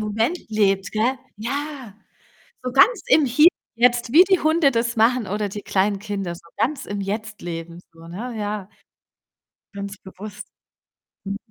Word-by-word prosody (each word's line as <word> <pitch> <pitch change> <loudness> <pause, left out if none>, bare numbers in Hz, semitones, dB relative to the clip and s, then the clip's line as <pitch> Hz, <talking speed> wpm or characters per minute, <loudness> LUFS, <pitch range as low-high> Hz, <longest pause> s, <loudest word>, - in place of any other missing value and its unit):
Moment 220 +10 0
lebt, 195 -3 +1
gell? 225 +5 +1 0.2
Ja. 265 -1 -5 0.7
So 250 -1 -3
ganz 450 - +5
im 310 - +5
Hier 275 +6 +5 0.3
und 235 - -9
jetzt, 240 -1 +3
wie 340 +4 +9
die 380 -1 +3
Hunde 315 -2 +3
das 235 -1 -1
machen, 230 0 +3
oder 205 +2 -2
die 205 +1 -7
kleinen 200 +1 +1
Kinder, 195 -3 -4
so 170 - -15
ganz 285 +2 0
im 205 0 -4
Jetzt 210 +2 -4
leben 170 0 -6
so, 165 0 -14
ne, 230 +9 -6
ja. 205 -2 -4 1.1
Ganz 200 0 -6
bewusst. 200 +2 -10 0.8
Mhm. 200 +1 -3
215 Hz, 155 wpm, -22 LUFS, 200-250 Hz, 1.1 s, wie